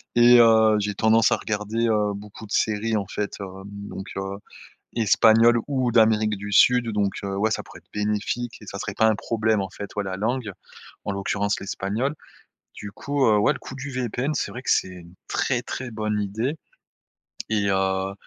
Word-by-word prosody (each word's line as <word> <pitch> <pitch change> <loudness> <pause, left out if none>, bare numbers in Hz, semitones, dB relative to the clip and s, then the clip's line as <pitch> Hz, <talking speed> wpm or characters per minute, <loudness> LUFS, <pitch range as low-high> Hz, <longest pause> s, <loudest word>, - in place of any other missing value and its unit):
et 120 0 +7
heu, 110 -2 +6
j'ai 105 0 -2
tendance 110 +1 +4
à - - +3
regarder, 110 +2 -2
heu, 105 -2 +1
beaucoup 105 +2 -10
de - - -19
séries, 110 +1 +1
en 100 - -2
fait, 105 +2 -4
heu, - - -3 0.2
donc, 100 -1 -8
heu, 95 0 -4 0.6
espagnoles 115 +1 +5
ou 130 -3 0
d'Amérique 110 -2 +3
du 105 +1 -7
Sud, 125 +3 +5
donc 100 -2 0
heu, 95 0 -3
ouais, 110 +2 +1
ça - - -1
pourrait - - -13
être - - -41
bénéfique 105 +3 -2
et - - -12
ça 100 - -7
serait 105 0 -5
pas 110 - +3
un 110 - +2
problème, 110 -1 0
en 95 - -6
fait, 100 - -8
ouais, 105 - -1
la 95 -1 -4
langue, 115 +1 -1 0.5
en - - -2
l'occurrence, 100 +1 -1
l'espagnol. 105 +8 -2 0.6
Du 105 - -8
coup, 140 +5 -1
heu, 105 -1 +4
ouais, 105 - +3
le - - -9
coup 135 - -9
du 135 +1 -6
VPN, 130 +3 -2
c'est - - -1
vrai 125 - -7
que - - 0
c'est - - +2
une 90 -1 -12
très 125 -3 0
très 125 0 -6
bonne 105 -1 -2
idée. 110 +9 -2 0.9
Et 105 -2 +1
heu, 95 0 0
105 Hz, 195 wpm, -24 LUFS, 100-115 Hz, 0.9 s, et